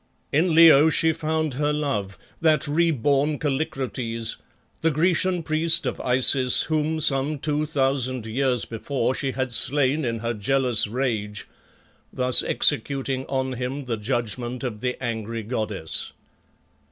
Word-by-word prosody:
In 160 +3 +1
Leo 160 -2 +7
she 160 0 +2
found 155 -1 -2
her 145 +3 -1
love, 135 - -3 0.2
that 155 -2 +2
re 165 +4 +1
born 145 +1 0
Kallikrates, 130 -6 -3 0.4
the 165 - +2
Grecian 175 +3 +1
priest 165 +2 +1
of - - -3
Isis 125 0 +4
whom 155 0 -1
some 140 0 +1
two 150 +1 -2
thousand 135 -4 -1
years 125 +1 0
before 130 +3 -2
she 135 0 -3
had 130 -1 -3
slain 140 +5 +3
in 115 -2 -2
her 115 +1 -3
jealous 120 0 +2
rage, 110 -3 -3 0.6
thus 125 -1 +2
executing 135 -1 0
on 130 -1 -2
him 130 +3 -5
the 120 -2 -2
judgment 120 +2 -3
of 110 -5 -5
the 125 -1 -2
angry 115 -1 -4
goddess. 105 -7 -3
135 Hz, 135 wpm, -23 LUFS, 120-150 Hz, 0.6 s, Leo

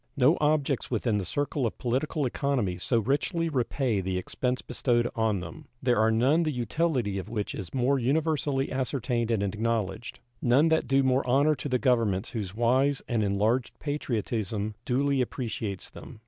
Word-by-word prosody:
No 140 +5 +5
objects 150 -3 +1
within 115 -3 0
the 95 - -3
circle 140 - -1
of - - -6
political 135 +5 -1
economy 125 -9 -1
so 120 +6 +1
richly 150 - 0
repay 125 -5 0
the 95 0 -2
expense 125 +7 -2
bestowed 120 -2 +1
on 110 -4 +1
them; 80 -3 -9
there 125 -3 +2
are 110 +1 +4
none 130 +9 +3
the 155 -2 0
utility 125 -4 -1
of 95 - -7
which 105 -3 -3
is 95 -5 -6
more 135 +1 +1
universally 140 0 0
ascertained 125 -3 -1
and 110 -4 +1
acknowledged; 110 +1 -2 0.2
none 135 +7 +4
that 160 -4 +2
do 135 +2 +3
more 130 0 +2
honor 140 +5 +4
to 145 0 -5
the 130 - +2
governments 115 -7 +1
whose 100 -5 -4
wise 130 +4 +2
and 120 -3 0
enlarged 105 +5 0
patriotism 110 -7 -2
duly 135 +1 +1
appreciates 110 -5 -4
them. - - -11
125 Hz, 165 wpm, -28 LUFS, 110-140 Hz, 0.2 s, No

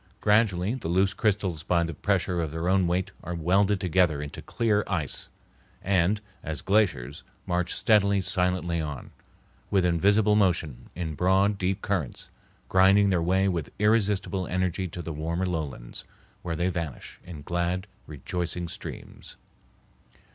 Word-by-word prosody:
Gradually 105 -2 +2
the 125 -9 -5
loose 95 +3 +2
crystals 95 -6 0
by 85 +1 +1
the 85 0 -3
pressure 90 +1 0
of 80 - -2
their 80 +3 -3
own 95 -1 +3
weight 90 +2 -1
are 85 +1 -4
welded 95 +4 +2
together 90 -4 +2
into 75 0 -6
clear 105 -3 0
ice, 80 -8 -2 0.6
and, 95 +2 +2 0.2
as 80 -2 -4
glaciers, 95 - +1 0.2
march 90 0 -1
steadily, 100 -3 +3
silently 90 -2 0
on, 75 -3 -6 0.6
with 95 -3 +2
invisible 100 +5 +3
motion, 85 - 0
in 80 -2 -3
broad, 95 +5 +2
deep 95 0 -1
currents, 95 -10 -2 0.4
grinding 95 +2 +5
their 90 -3 +2
way 95 +3 +2
with 85 -6 -2
irresistible 105 -3 +1
energy 95 0 -1
to 85 +1 -7
the 80 - -5
warmer 85 +4 -2
lowlands, 75 -9 -4 0.4
where 85 -2 -3
they 85 +3 0
vanish 85 -7 -5
in 80 -5 -9
glad, 85 +3 -1 0.2
rejoicing 85 +3 -3
streams. - - -8
90 Hz, 140 wpm, -27 LUFS, 85-100 Hz, 0.6 s, grinding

